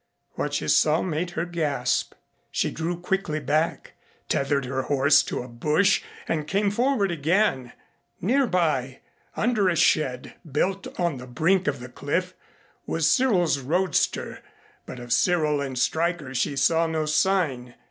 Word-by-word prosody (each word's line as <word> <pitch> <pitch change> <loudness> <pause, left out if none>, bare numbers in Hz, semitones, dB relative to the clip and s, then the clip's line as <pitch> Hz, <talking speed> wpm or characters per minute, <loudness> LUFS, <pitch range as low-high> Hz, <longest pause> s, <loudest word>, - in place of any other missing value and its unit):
What - - -3
she - - -2
saw 155 +1 +3
made 175 0 -2
her 165 - 0
gasp. 155 -7 -1 0.3
She - - -1
drew 170 +2 -3
quickly 180 -3 -1
back, 155 +4 -1 0.4
tethered 140 0 0
her 130 +1 -2
horse 140 +1 +4
to - - -4
a - - -10
bush 150 +11 +2 0.3
and 155 -2 -2
came 200 +2 +1
forward 235 -3 +1
again. 160 - 0 0.5
Near 255 +8 +2
by, 150 - 0 0.4
under 215 -5 +2
a 175 - 0
shed 130 -6 +1 0.2
built 190 +7 -1
on 170 -5 0
the 125 0 -9
brink 165 +9 +1
of 140 -2 -1
the 125 - -8
cliff, 170 +8 -3 0.5
was - - +1
Cyril's 185 - +2
roadster, 175 +8 0 0.5
but 130 - -8
of 120 -1 -3
Cyril 155 -5 +2
and 135 -2 -4
Stryker 160 0 -1
she 135 +3 -1
saw 165 +4 +2
no 160 -1 -1
sign. 150 -7 0
160 Hz, 145 wpm, -25 LUFS, 135-185 Hz, 0.5 s, horse